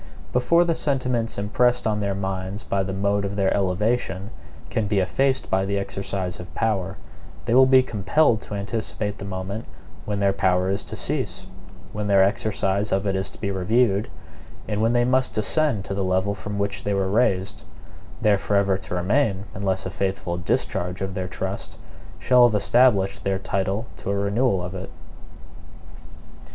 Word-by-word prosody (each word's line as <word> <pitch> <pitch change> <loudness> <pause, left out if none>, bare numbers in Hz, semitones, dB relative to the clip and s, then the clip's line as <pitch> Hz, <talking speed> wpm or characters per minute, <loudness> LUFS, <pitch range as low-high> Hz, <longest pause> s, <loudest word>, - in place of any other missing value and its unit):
Before 170 +8 +4
the 170 -1 +1
sentiments 125 -6 0
impressed 120 +5 +1
on 105 -1 +1
their 100 -1 -1
minds 95 +1 -4
by 100 - 0
the 95 0 -3
mode 100 +1 0
of 100 0 -3
their 95 -1 +2
elevation 100 0 0 0.4
can 110 -2 0
be 100 - 0
effaced 130 +8 +1
by 95 0 +2
the 100 +1 -1
exercise 100 -2 -4
of 90 - -10
power, 100 -4 -1 0.5
they 115 - 0
will 130 +1 +7
be 130 0 +6
compelled 110 +3 +2
to 105 - -7
anticipate 105 0 -3
the 100 - -6
moment 100 +3 -5 0.4
when 105 -1 -2
their 100 -1 +3
power 95 -1 +1
is 100 +1 -1
to - - -7
cease, - - -2 0.5
when 105 0 -3
their 100 -1 +5
exercise 100 0 0
of 95 +1 +1
it 100 -1 0
is 95 +1 -1
to - - -17
be 100 - -2
reviewed, 100 +2 +1 0.6
and 105 0 -1
when 115 +1 +2
they 120 0 +3
must 130 +1 +1
descend 115 -1 +1
to - - -4
the 100 0 -1
level 95 +2 +1
from 105 0 -6
which 100 0 -2
they 100 -1 0
were 95 -1 +1
raised; 100 -2 +1 0.6
there 105 -2 +4
forever 100 -2 +1
to 90 - -5
remain 100 +2 +1
unless 95 -2 -1
a 95 - -3
faithful 95 -2 -2
discharge 90 -1 -2
of 95 -1 -3
their 95 0 -3
trust - - -5 0.4
shall 125 -1 +5
have 110 - -1
established 105 -2 +3
their 95 -1 0
title 95 +3 -2
to - - -6
a 100 - +1
renewal 100 0 +1
of 90 +1 -5
it. 95 0 -6
100 Hz, 175 wpm, -24 LUFS, 95-110 Hz, 0.6 s, will